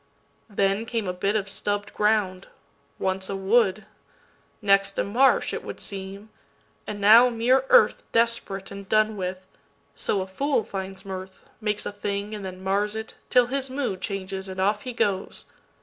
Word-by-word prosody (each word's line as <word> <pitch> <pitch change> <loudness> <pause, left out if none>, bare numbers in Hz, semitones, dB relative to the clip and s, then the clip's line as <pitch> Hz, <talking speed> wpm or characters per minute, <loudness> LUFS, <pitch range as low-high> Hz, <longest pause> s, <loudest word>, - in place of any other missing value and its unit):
Then 200 +2 0
came 225 -4 -2
a 180 - -1
bit 195 +3 -1
of 205 -2 0
stubb'd 205 +1 -3
ground, 210 -3 +1 0.5
once 190 0 -2
a 195 - -2
wood, 200 +1 +2 0.7
Next 195 -1 +3
a - - +2
marsh, 250 +7 +3
it - - -4
would - - -7
seem, 200 +2 -5 0.6
and 210 -1 -5
now 225 +5 +8
mere 245 +3 +3
earthDesperate 225 -3 +2
and 200 -1 -9
done 215 0 +3
with; 185 -1 -4 0.5
(so 200 - 0
a - - -3
fool 250 +6 0
finds 195 -1 -6
mirth, 190 0 -7 0.2
Makes 210 -1 -1
a - - -3
thing 205 0 -4
and 210 -2 -6
then 185 0 -7
mars 205 +2 0
it, 220 0 -6 0.2
till 250 -1 +5
his 265 +2 -2
moodChanges 195 -6 -3
and 185 0 -6
off 205 +2 +1
he 255 - -6
goes!) 200 -4 -1
200 Hz, 160 wpm, -25 LUFS, 190-220 Hz, 0.7 s, now